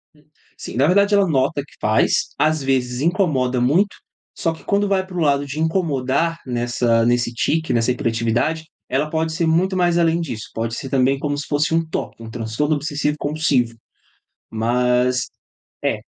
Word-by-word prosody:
Hum, 150 - -24 0.3
sim, - - -8
na 135 - +4
verdade 200 +3 +3
ela 200 -1 +4
nota 140 -1 +1
que - - -22
faz, 110 +1 +2
às 155 0 +2
vezes 125 -2 0
incomoda 145 -8 +1
muito, 170 +12 +2 0.4
só 165 -1 0
que - - -14
quando 200 0 +1
vai 190 -1 +1
para 185 -1 -8
o - - 0
lado 145 -2 +2
de 140 +2 -6
incomodar 160 -1 0
nessa 120 -2 +1
nesse 120 0 +1
tique, 155 +3 0
nessa 115 +1 +2
hiperatividade, 120 +5 -1 0.2
ela 145 +4 0
pode 160 0 -1
ser 165 0 0
muito 180 +4 +2
mais 175 -2 +2
além 170 0 +2
disso, 120 -9 -6
pode 115 0 -3
ser 135 - -6
também 135 0 +2
como 145 0 -1
se 145 - -5
fosse 150 +2 0
um 165 - +3
TOC, 135 - -5
um 115 - -8
Transtorno 120 +7 -1
Obsessivo 150 0 -2
Compulsivo. 145 -6 0 0.8
Mas, 125 +3 +1 0.6
é, - - 0
145 Hz, 175 wpm, -20 LUFS, 125-165 Hz, 0.8 s, na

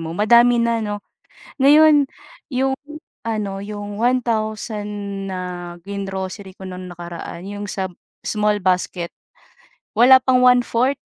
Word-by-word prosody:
mo 165 +1 -5
madami 235 +3 +5
na 235 -1 +1
'no? 205 -1 -4 0.6
Ngayon, 295 +1 +7 0.5
yung 265 +1 +1 0.5
ano, 205 -3 -3
yung 205 0 -6
1,000 220 -3 -1 0.4
na 185 - -3 0.5
gin-grocery 195 0 -5
ko 190 - -7
nung 180 -1 -7
nakaraan 175 +1 -8
yung 205 0 -5
sa 190 -1 -2 0.4
small 210 -1 +1
basket, 180 -2 -1 0.8
wala 260 +2 +8
pang 260 -1 +3
1/4. 250 +1 +3
210 Hz, 115 wpm, -21 LUFS, 195-245 Hz, 0.8 s, wala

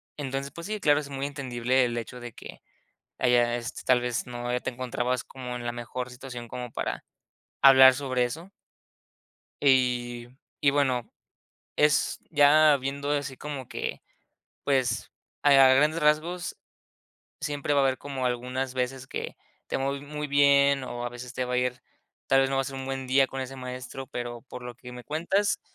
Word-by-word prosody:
entonces, 135 -1 -4
pues 170 +2 -7
sí, 215 0 -3
claro, 145 -5 +4
es 145 -1 -7
muy 135 0 -3
entendible 130 -2 0
el 120 0 -3
hecho 125 +2 -6
de 120 0 -8
que - - -11 0.6
haya, 120 -1 +3
este, 120 0 -5
tal 125 -1 +4
vez 125 -1 -2
no 120 0 -5
te - - -2
encontrabas 125 0 -2
como 125 -2 -7
en 120 -1 -6
la 120 - -1
mejor 125 +1 -5
situación 125 -2 -8
como 125 0 -6
para - - -3 0.6
hablar 130 -1 +9
sobre 130 -2 -1
eso. 160 +10 -5 1.1
Y 125 -3 +2 0.3
y 140 - +4
bueno, 130 -4 0 0.7
es 150 -1 +2
ya 150 0 +6
viendo 140 +2 -3
así 140 -2 -2
como 140 -3 -6
que, - - -4 0.6
pues, 130 -4 0 0.3
a 145 - +5
grandes 135 +4 +6
rasgos 155 +4 +1 0.8
siempre 145 0 -2
va 140 - +4
a - - +3
haber 130 -1 +2
como 135 -2 -4
algunas 125 +1 -2
veces 130 +1 -2
que - - -5 0.3
te - - -1
va 135 +1 -1
ir 140 - -8
muy 150 +1 -5
bien 140 -1 +4
o 120 -1 -5
a 120 - -2
veces 120 +1 -9
te 130 - -2
va 125 - -4
a 125 - +2
ir, 125 0 -1 0.5
tal 135 0 +5
vez 135 - +1
no 135 - -1
va 135 - +2
a - - -2
ser 135 - -6
un 135 0 -5
buen 135 0 -4
día 135 +1 +4
con 135 - -6
ese 130 +1 -6
maestro, 125 +1 -7
pero 120 -3 -5
por 125 -1 -9
lo 125 -1 -7
que 125 0 -11
me 125 0 -9
cuentas, 175 +7 0
130 Hz, 185 wpm, -27 LUFS, 125-140 Hz, 1.1 s, hablar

